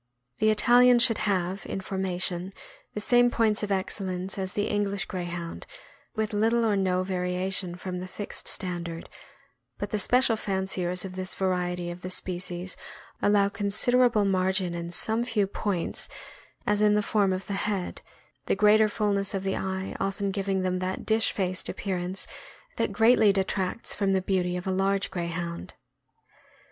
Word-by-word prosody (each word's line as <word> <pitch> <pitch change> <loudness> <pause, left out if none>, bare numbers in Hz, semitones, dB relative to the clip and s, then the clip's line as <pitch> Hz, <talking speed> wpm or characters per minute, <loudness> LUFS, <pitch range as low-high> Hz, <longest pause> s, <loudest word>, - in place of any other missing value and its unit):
The 215 - +4
Italian 245 +3 +6
should 235 -2 +4
have, 185 0 -1
in - - -3
formation, 185 -1 -2 0.4
the - - -1
same 245 +3 +4
points 225 -3 +1
of 210 -1 -3
excellence 190 -1 -2
as 190 -1 -3
the 205 - 0
English 200 -1 0
Greyhound, 175 -2 -5 0.5
with 220 -1 -1
little 225 +3 +2
or 215 -2 +2
no 185 -1 +1
variation 180 0 -1
from 180 0 -5
the 185 - -6
fixed 205 +2 -5
standard; 175 -3 -4 0.7
but 205 0 -4
the 210 - 0
special 250 +2 +4
fanciers 190 -3 -2
of 185 -1 -7
this 185 0 -3
variety 180 -2 -1
of 175 +1 -9
the 185 - -5
species 180 0 -4 0.5
allow 205 -1 +4
consid 205 +4 0
erable 245 -4 +4
margin 185 -1 +1
in 170 0 -4
some 220 +5 +1
few 225 -4 +1
points, 195 -3 -2 0.6
as 210 0 +2
in 210 0 +5
the 210 - +2
form 200 -2 +2
of 185 +1 -2
the 200 - -4
head, 195 -2 -2 0.5
the - - +2
greater 210 +1 +5
fullness 200 -2 0
of 195 - -2
the 195 0 -1
eye 190 0 -3
often 195 0 -1
giving 195 -1 -1
them 185 0 0
that 185 +1 -3
"dish 220 0 +3
faced" 185 -2 -1
appearance 185 -1 -2 0.5
that - - 0
greatly 225 -2 +5
detracts 190 +2 -1
from 195 -1 +1
the 190 - +2
beauty 180 -2 0
of 180 - -6
a 190 - 0
large 195 +1 +1
Greyhound. 170 - -4
195 Hz, 160 wpm, -27 LUFS, 185-210 Hz, 0.7 s, Italian